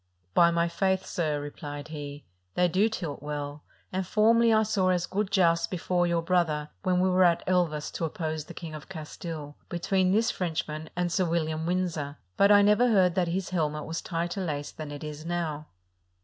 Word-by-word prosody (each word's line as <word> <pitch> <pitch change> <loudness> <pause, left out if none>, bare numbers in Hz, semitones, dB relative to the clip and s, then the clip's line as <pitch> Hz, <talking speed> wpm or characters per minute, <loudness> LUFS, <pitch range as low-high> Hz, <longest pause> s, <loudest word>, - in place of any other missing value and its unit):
"By 170 +8 +6
my 170 0 +2
faith, 190 +2 0
sir," 155 -4 -1
replied 145 0 -7
he, 145 -2 -7 0.3
"they 180 - +4
do 190 +6 +2
tilt 165 -11 -5
well; 145 0 -5 0.3
and 190 +1 0
formerly 225 +4 +4
I 220 0 +5
saw 205 -4 +1
as 180 -1 +1
good 200 +2 -1
jousts 170 -4 +3
before 175 0 0
your 170 -1 +1
brother, 165 -4 +1
when 185 -2 +1
we 185 - +3
were 185 0 +4
at 170 -2 +3
Elvas 170 -5 +1
to 165 - -2
oppose 155 -1 -3
the - - -11
King 165 -3 -7
of 155 - -9
Castile, 155 -1 -7
between 185 +2 +1
this 225 +4 +3
Frenchman 160 -3 -3
and 175 0 0
Sir 185 +1 +2
William 160 -1 -1
Windsor; 165 -5 -1 0.2
but 200 +1 +5
I 205 0 +7
never 210 +4 +5
heard 190 -6 +4
that 180 -1 +1
his 185 +3 -2
helmet 150 -4 -1
was 165 +1 -4
tighter 175 +2 -2
laced 145 -4 -4
than 155 -2 -5
it 145 0 -7
is 150 0 -6
now." 160 -3 -3
170 Hz, 190 wpm, -28 LUFS, 155-185 Hz, 0.3 s, I